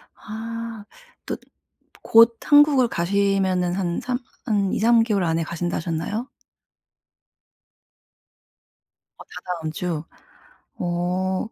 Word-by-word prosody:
아 225 0 -7 0.4
또 - - -3 0.7
곧 230 0 +6
한국을 290 -4 +5
가시면은 190 -1 +1
한 175 -3 -1
3 250 +1 -2 0.3
한 200 -5 +1
2-3 230 +1 +4
개월 205 -5 0
안에 165 0 0
가신다 170 +1 -3
하셨나요? 175 +9 -3 2.9
어 - - -11
다다음 170 -4 -4
주. 165 -2 -3 0.7
어. 180 +3 -1
195 Hz, 150 characters per minute, -23 LUFS, 175-230 Hz, 2.9 s, 곧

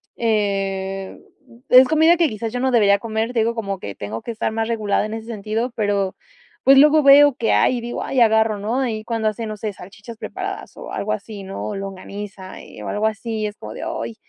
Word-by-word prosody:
eh, 195 -3 -1 0.3
mm, 235 - -18
es 255 +1 +9
comida 320 +2 +5
que 330 -4 +3
quizás 220 +2 -5
yo 245 - -2
no 260 - +1
debería 205 -4 +4
comer, 225 +1 -2
te 235 - +1
digo, 230 +1 +1
como 200 -3 -3
que 100 - -6
tengo 105 +2 -6
que 235 - -5
estar 220 - -2
más 225 0 -1
regulada 215 -3 0
en 215 - -5
ese 225 0 -6
sentido, 225 +2 -3
pero, 200 -3 0 0.5
pues, 270 +1 +7
luego 300 +2 +6
veo 280 -1 +7
que 230 - 0
hay 255 - +3
y 235 - -4
digo: 240 +1 -5
"Ay, 260 - 0
agarro", 220 -2 +3
¿no?, 225 +6 -1
ahí 220 -5 -2
cuando 225 -1 -1
hace, 215 +2 -2
no 215 - -6
sé, 210 -1 -4
salchichas 200 +5 -12
preparadas 380 - -6
o - - -8
algo 215 - -2
así, 200 -1 -5
¿no? 190 +1 -6
O 210 - -4
longaniza, 195 0 -8
eh, - - -12
o - - -6
algo 210 +1 -1
así, 220 0 -4
y 210 - 0
es 210 - -9
como 110 +1 -9
de: - - -7
"Ay", 115 0 -4
220 Hz, 230 wpm, -21 LUFS, 200-235 Hz, 0.5 s, es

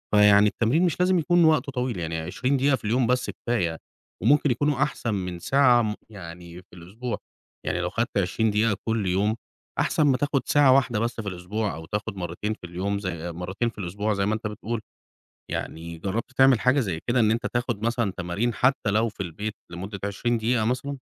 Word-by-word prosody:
فيعني 105 0 +7
التمرين 120 - +2
مش 175 - -1
لازم 180 0 +3
يكون 175 +1 +3
وقته 155 -3 +3
طويل، 125 -6 -2
يعني 80 -1 -3
20 125 +12 -1
دقيقة 135 +1 +3
في 120 - -11
اليوم 120 +3 +2
بس 125 +1 +1
كفاية 90 -9 -1 0.5
وممكن 145 -1 +4
يكونوا 145 +3 +1
أحسن 125 -6 -2
من 90 -3 -3
ساعة 125 +2 +4
م 105 -1 -1
يعني 85 -3 -10
في 90 - -31
الأسبوع. 105 +7 -5 0.5
يعني - - -1
لو - - -1
خدت - - -2
20 110 -1 +1
دقيقة 105 -1 +2
كل 110 -3 0
يوم، 100 +5 +1 0.4
أحسن - - +2
ما 135 -3 +4
تاخُد 145 -1 0
ساعة 145 -3 +5
واحدة 125 -5 +2
بس 115 0 -2
في 105 - -8
الأسبوع، 100 +4 -3
أو 80 0 -8
تاخُد 105 +3 -4
مرّتين 90 +4 -3
في 90 - -10
اليوم 100 +4 -2
زي 85 -3 -4
مرّتين 95 +7 -2
في 115 - -17
الأسبوع 105 +3 -2
زي 100 -1 0
ما 105 - +1
أنت 110 - -4
بتقول. 110 +2 -4 0.7
يعني 85 +1 -5
جرّبت 100 +9 -3
تعمل 130 -3 +6
حاجة 130 +5 +3
زي 95 -9 -2
كده 120 +1 +2
إن 110 -2 +4
أنت 115 - -1
تاخُد 120 -3 -2
مثلًا 115 -3 0
تمارين 95 +7 -1
حتّى 125 -3 +2
لو 110 +3 +2
في 100 -2 -6
البيت 100 +6 -5 0.2
لمُدّة 95 +3 -6
20 115 +4 0
دقيقة 115 0 +1
مثلًا؟ 130 +4 -2
110 Hz, 200 wpm, -25 LUFS, 95-125 Hz, 0.7 s, فيعني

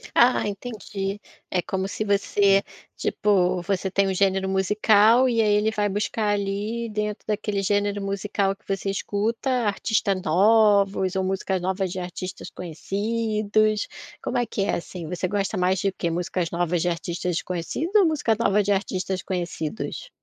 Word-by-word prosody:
Ah 245 +1 +5
entendi, 205 -2 -4 0.3
é 180 - +1
como 190 +2 -2
se 215 - -3
você, 200 -1 +3 0.4
tipo, 185 -3 +1
você 190 0 -1
tem 195 +1 +2
um - - +1
gênero 190 0 +1
musical 210 +5 +4
e 235 -3 +2
aí 210 -2 +3
ele 210 +1 +2
vai 210 -2 0
buscar 210 +2 -1
ali 205 +4 -2
dentro 210 0 -3
daquele 210 -1 -1
gênero 205 +1 0
musical 195 0 -1
que - - -33
você 195 0 -1
escuta, 210 +5 -2
artistas 215 -4 +1
novos 200 +1 +3
ou 190 - +1
músicas 190 -1 -1
novas 190 0 -1
de 185 - -5
artistas 180 +1 -6
conhecidos. 215 +4 -1 0.3
Como - - -2
é 245 - +2
que 220 - -5
é 205 - 0
assim? 170 -1 -6
Você 180 +2 -2
gosta 200 +2 -1
mais 185 +1 +2
de 195 - +1
quê? 175 -2 -3
Músicas 175 0 -2
novas 175 -1 0
de 175 - +1
artistas 170 +1 -3
desconhecidos 185 - -3
ou 410 - +7
música 295 -9 +1
nova 210 -3 +3
de 205 - -2
artistas 190 -2 -1
conhecidos? 180 - -4
200 Hz, 160 wpm, -24 LUFS, 185-210 Hz, 0.4 s, ou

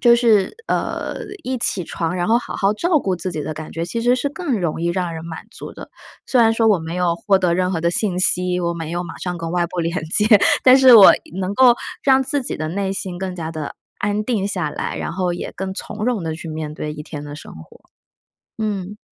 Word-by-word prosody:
就 240 -1 +6
是， 225 - +3
呃， - - -2 0.3
一 255 0 -2
起 190 -6 -1
床 165 +3 -3
然 175 - -1
后 230 +2 +4
好 285 - -7
好 200 +1 +2
照 335 +8 +2
顾 190 -7 -1
自 180 +1 -4
己 155 -3 -4
的 155 - -4
感 155 0 -8
觉， 165 0 -3
其 230 +6 -3
实 245 +2 +3
是 280 +3 -1
更 290 - -2
容 165 -1 -2
易 170 - 0
让 175 -1 -2
人 160 - -6
满 165 -1 -8
足 - - -9
的。 - - -11 0.4
虽 250 - +3
然 225 - +5
说 225 -1 +2
我 200 -4 +4
没 160 +1 -6
有 175 -2 +1
获 195 +3 +2
得 180 -2 +1
任 185 0 +1
何 165 - -1
的 170 +1 +1
信 180 -1 -1
息， 180 0 +1
我 170 0 0
没 165 -1 -5
有 175 +1 -2
马 - - -9
上 180 -1 -4
跟 165 0 -4
外 175 -1 +1
部 180 0 -4
连 170 +2 -2
接， 210 +6 +1 0.4
但 255 0 +8
是 260 -2 +8
我 210 -4 +10 0.3
能 190 +1 -2
够 245 -1 +6 0.3
让 265 -1 +4
自 275 +1 -1
己 - - -4
的 155 0 -3
内 190 +2 -2
心 185 -2 -5
更 185 -1 -4
加 160 -1 -4
地 155 -2 -5 0.2
安 205 +1 -1
定 210 -5 -1
下 175 -6 -2
来， - - -4
然 - - -4
后 180 0 -1
也 - - -6
更 190 0 -5
从 210 +1 -5
容 235 -7 0
地 160 -1 -2
去 165 0 -8
面 155 -1 -5
对 150 -1 -4
1 150 - -7
天 150 -1 -8
的 145 0 -8
生 - - -11
活。 80 0 -14 0.8
嗯。 205 -2 -3
185 Hz, 265 characters per minute, -20 LUFS, 170-220 Hz, 0.8 s, 我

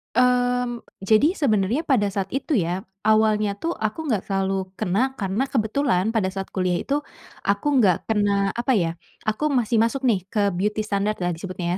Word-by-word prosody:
Mmm, 245 -1 +2 0.2
jadi 220 - +4
sebenernya 235 - +1
pada 205 -8 +2
saat 195 -1 -2
itu 280 +4 -3
ya, 180 +3 -2 0.2
awalnya 215 -2 +3
tuh 330 +11 -3
aku 260 +4 -3
gak 205 - -1
terlalu 195 -1 -1
kena 245 +11 0
karena 205 +6 -1
kebetulan 225 -4 +1
pada 215 -5 +1
saat 195 0 -5
kuliah 180 -2 0
itu, 285 +1 0 0.5
aku 255 +8 +2
nggak 185 -6 +4
kena 200 -2 +2
apa 240 +1 0
ya, 170 -4 +1 0.3
aku 215 +8 0
masih 240 -5 +1
masuk 245 +4 +1
nih 200 -7 +1
ke 205 -1 +1
beauty 210 +4 -1
standard 210 0 -1
lah 175 - +1
disebutnya 175 0 -3
215 Hz, 170 wpm, -23 LUFS, 195-245 Hz, 0.5 s, jadi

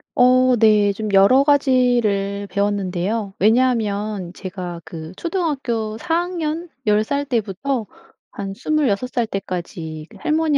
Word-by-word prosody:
어 255 0 +5
네. 210 -2 +4
좀 215 +2 -4
여러 225 +8 +6
가지를 240 -8 +2
배웠는데요. 200 0 -1
왜냐하면 210 -4 +1
제가 180 -3 -6
그 160 0 -9
초등학교 270 - -2
4 330 -1 -1
학년 345 -1 -3 0.2
10 210 0 +3
살 285 +4 -1
때부터 240 0 -2 0.4
한 195 -1 -6
26 255 -3 0
살 240 -2 0
때까지 170 -6 -5
그 - - -15
할머니 310 -1 +1
215 Hz, 220 characters per minute, -20 LUFS, 195-265 Hz, 0.4 s, 여러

